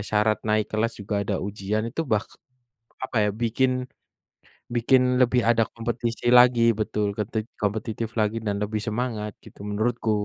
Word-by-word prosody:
syarat 105 0 +2
naik 110 0 +2
kelas 115 +2 0
juga 100 +1 -4
ada 100 0 -2
ujian 105 +2 -2
itu, 115 - -4
bahk 105 0 +1 0.8
apa 125 - -2
ya, - - +2
bikin 125 +3 +2 1.0
bikin 125 +2 +4 0.2
lebih 125 0 +4
ada 115 -1 +4
kompetisi 115 0 -3
lagi 125 -1 +7 0.2
betul, 105 -1 0
ketik 110 +1 -2 0.2
kompetitif 110 +2 -2
lagi, 110 +1 +1
dan 105 -2 -2
lebih 105 0 -2
semangat, 110 -2 -2
gitu, - - -15
menurutku. 110 +2 0
110 Hz, 145 wpm, -25 LUFS, 105-120 Hz, 1.0 s, lagi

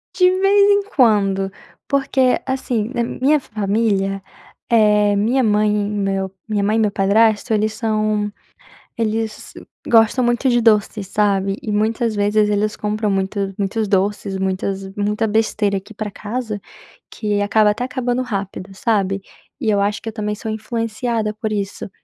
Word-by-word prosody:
De 365 -1 +5
vez 395 +2 +4
em 405 0 +3
quando. 195 -6 +3 0.4
Porque, 265 -2 +2
assim, 250 -4 -2
na 240 - 0
minha 275 +5 +1
família, 200 -3 -1 0.5
eh, 210 -3 +4
minha 235 +6 +2
mãe, 210 -1 +3
meu 200 -2 -1 0.2
minha 210 -2 0
mãe 210 +2 +1
e - - +2
meu 210 -2 +2
padrasto, 210 +3 +2
eles 215 0 +1
são 215 -2 -1 0.7
eles 220 -1 -3 0.3
gostam 230 +2 +4
muito 240 +2 +1
de 240 - +3
doce, 210 -2 +2
sabe? 195 0 0
E 215 - -4
muitas 220 +2 0
vezes 210 +1 +2
eles 210 +1 0
compram 210 0 -2
muitos 195 +2 -1
doces, 195 0 0
muitas 190 0 -2
muita 210 +2 0
besteira 210 -2 +1
aqui 195 +4 -9
para 210 0 -4
casa, 215 0 -4 0.5
que 210 -2 -2
acaba 210 +1 +3
até 220 +4 -3
acabando 250 -1 -1
rápido, 200 -5 -4
sabe, 195 -2 0 0.4
e 235 -6 -1
eu 205 - +2
acho 205 +1 -1
que 225 - -5
eu - - -9
também 210 -1 -3
sou 220 +1 -5
influenciada 225 0 -2
por 215 0 -4
isso 200 -1 -4
215 Hz, 150 wpm, -19 LUFS, 205-230 Hz, 0.7 s, De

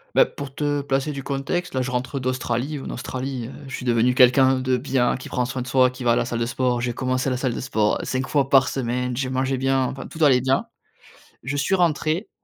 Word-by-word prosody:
Bah, - - +7
pour 140 -1 -8
te 145 -1 -1
placer 140 +1 -1
du 140 -2 -6
contexte, 145 +6 -2
là, 130 - 0
je 130 - -2
rentre 125 +2 -2
d'Australie. 130 +2 -2
En - - -6
Australie, 130 -1 -4
heu, - - -9 0.2
je 135 - -5
suis - - -7
devenu 120 +1 +3
quelqu'un 130 +1 +5
de 130 0 +1
bien, 125 -1 +1
qui 125 - -9
prend 125 - -1
soin 125 +1 -4
de - - -10
soi, 130 -1 +4
qui 125 0 -9
va 120 - +3
à - - +4
la - - +1
salle 120 -1 -3
de 115 - 0
sport. 125 0 0
J'ai 120 0 -1
commencé 130 +1 -1
la 125 - 0
salle 125 -2 -1
de - - -4
sport 110 -4 +1
5 130 0 -2
fois 140 -3 +1
par 135 -1 +5
semaine, 125 -1 -2
j'ai 130 -1 -1
mangé 130 +1 0
bien, 135 0 +1
enfin 135 +1 -5
tout 160 -1 -3
allait 130 -4 +5
bien. 130 +1 +1 0.8
Je 135 +4 -3
suis 145 +7 +1
rentré, 170 +1 0
130 Hz, 245 wpm, -23 LUFS, 125-135 Hz, 0.8 s, Bah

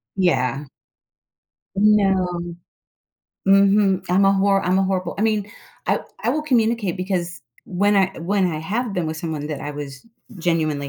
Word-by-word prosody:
Yeah. 140 -7 +1 1.1
No. 195 -4 +3 1.1
Mhm, 195 -1 +4
I'm 185 +2 +3
a 195 - +5
horr 195 0 +2
I'm 185 +1 +2
a - - +3
horrible 185 -2 -1
I - - 0
mean, 215 -2 0 0.4
I - - +1 0.2
I - - +1
will 305 0 -1
communicate, 230 - +1
because 180 -2 -3 0.3
when 200 +3 +1
I 195 - +5
when 190 +3 +1
I 160 -3 -2
have 210 +8 -3
been 175 -4 -1
with 155 0 -4
someone 155 -3 -4
that 150 -3 -4
I 145 - -5
was 145 +2 -8 0.3
genuinely 155 -4 -1
185 Hz, 155 wpm, -21 LUFS, 165-200 Hz, 1.1 s, a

